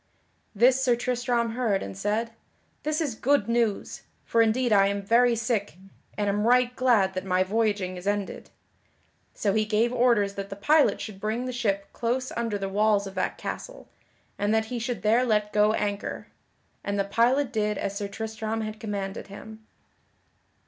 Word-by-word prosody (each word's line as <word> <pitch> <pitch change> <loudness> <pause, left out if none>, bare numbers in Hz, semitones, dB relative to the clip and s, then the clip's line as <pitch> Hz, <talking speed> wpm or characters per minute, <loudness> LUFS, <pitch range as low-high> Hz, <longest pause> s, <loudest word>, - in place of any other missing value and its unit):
This 250 +5 +4
Sir 245 -2 +3
Tristram 240 -1 -1
heard 225 -5 0
and 100 0 -7
said: 220 - -1 0.5
"This 305 +1 -1
is 290 -7 -1
good 280 +5 +1
news, 230 -3 -1 0.2
for 230 - +3
indeed 230 +1 +2
I 195 -1 +5
am 200 0 -2
very 235 +3 +4
sick 220 -5 -2 0.4
and 205 -1 0
am 205 +2 +1
right 250 0 +3
glad 225 -7 +3
that 185 - -3
my 185 -1 +2
voyaging 200 -2 -1
is 180 +2 -8
ended." 205 -1 -2 0.9
So 200 -2 0
he 215 +1 +2
gave 220 +3 +1
orders 235 -5 +3
that 200 0 -6
the 195 - -6
pilot 295 +9 +3
should 195 -3 -7
bring 220 +4 -2
the 255 - -3
ship 200 -5 -2
close 255 +2 -2
under 230 -3 -2
the 195 -1 -3
walls 205 +1 +2
of 195 - -7
that 185 - -2
castle, - - -7 0.5
and 205 +1 +1
that 220 0 +1
he 240 - -2
should 230 -4 -4
there 225 +4 +4
let 210 -3 0
go 210 +1 +4
anchor; 205 -1 -3 0.5
and 200 0 -2
the 200 - +2
pilot 245 +7 +1
did 210 -2 0
as 200 - -3
Sir 200 0 -3
Tristram 220 +2 -4
had 215 0 -5
commanded 200 -3 -4
him. 220 +2 -11
220 Hz, 175 wpm, -26 LUFS, 200-240 Hz, 0.9 s, I